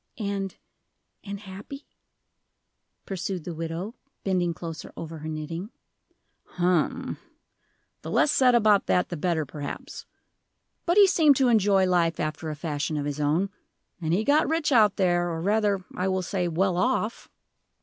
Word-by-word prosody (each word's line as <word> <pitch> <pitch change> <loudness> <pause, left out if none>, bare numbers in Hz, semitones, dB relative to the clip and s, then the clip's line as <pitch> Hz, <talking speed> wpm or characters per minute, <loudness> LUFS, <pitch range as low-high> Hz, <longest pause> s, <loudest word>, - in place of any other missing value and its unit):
"And 200 -3 -3 0.7
and 200 -1 -6
happy?" 205 +8 -9 1.2
pursued 190 -2 -4
the 175 - -5
widow, 165 +6 -4 0.3
bending 180 -3 +1
closer 165 -1 -7
over 165 -1 -6
her 155 - -7
knitting. 165 +5 -5 0.9
"Hum 180 -2 0 0.8
the - - -7
less 300 - +3
said 250 -2 +4
about 210 -3 +4
that 180 - +2
the 175 - -3
better, 165 -1 0
perhaps. 145 +1 -7 0.8
But 345 +3 +3
he 410 - +9
seemed 320 -7 +5
to 260 -1 +3
enjoy 200 -4 +4
life 170 -3 +2
after 155 +1 -3
a 155 - -4
fashion 150 0 -2
of 145 - -2
his 145 0 -3
own. 160 +7 +1 0.5
And 160 -1 -1
he 190 +6 +2
got 295 +5 +3
rich 320 -2 +1
out 215 -6 +5
there, 175 -2 +2
or 165 -1 -3
rather, 200 0 +1
I 185 - -1
will 190 -1 0
say, 180 -1 -1
well 175 +2 +1
off." 235 +1 0
185 Hz, 150 wpm, -26 LUFS, 165-210 Hz, 1.2 s, he